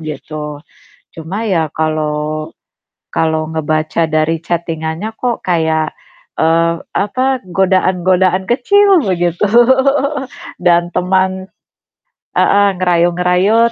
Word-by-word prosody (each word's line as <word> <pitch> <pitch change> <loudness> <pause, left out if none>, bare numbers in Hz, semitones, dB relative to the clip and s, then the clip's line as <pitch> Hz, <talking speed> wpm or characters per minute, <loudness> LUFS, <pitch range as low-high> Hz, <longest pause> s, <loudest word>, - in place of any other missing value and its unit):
Gitu. 150 -1 -7 0.5
Cuma 185 +8 -5
ya 165 -5 +1
kalau 155 0 -2 0.6
kalau 160 -1 0
ngebaca 155 +1 -1
dari 155 +1 0
chatting-annya 170 +4 -3
kok 245 -2 -2
kayak, 160 -3 0 0.4
eee, 165 +1 +2 0.2
apa, 255 +5 0
godaan-godaan 185 0 +1
kecil 380 - +3
begitu 175 0 0 1.2
dan 175 -1 +3
teman 185 +1 0 0.9
heeh, 200 0 +4
ngerayu-ngerayu, 180 +5 +2
175 Hz, 85 wpm, -15 LUFS, 160-190 Hz, 1.2 s, heeh